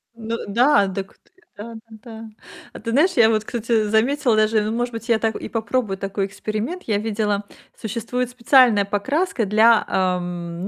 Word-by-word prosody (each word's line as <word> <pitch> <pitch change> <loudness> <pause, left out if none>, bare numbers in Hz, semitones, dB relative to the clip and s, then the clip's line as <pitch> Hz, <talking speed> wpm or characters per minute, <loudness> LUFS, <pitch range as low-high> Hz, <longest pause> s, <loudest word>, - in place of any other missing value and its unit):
Ну 230 0 -5
да! 240 0 +3
Дак 190 0 -6
т - - -33 0.3
да-да-да. 225 0 -11 0.4
А - - -10
ты 230 - -5
знаешь, 315 +9 +3
я 225 -1 +6
вот, 215 -1 +1
кстати, 230 -1 -1
заметила 240 +2 +2
даже 215 0 +2
ну, 215 +1 -2
может 240 +1 -2
быть, 230 +1 -8
я 225 -1 +3
так 220 -1 -1
и - - -6
попробую 225 -3 -2
такой 195 0 -3
эксперимент. 215 - -5
Я 215 -3 -1
видела, 210 -2 -2 0.3
существует 235 +3 -4
специальная 245 -4 +4
покраска 265 - -1
для, 220 +2 +4
ам, 175 -1 -2
220 Hz, 165 wpm, -21 LUFS, 205-235 Hz, 0.4 s, я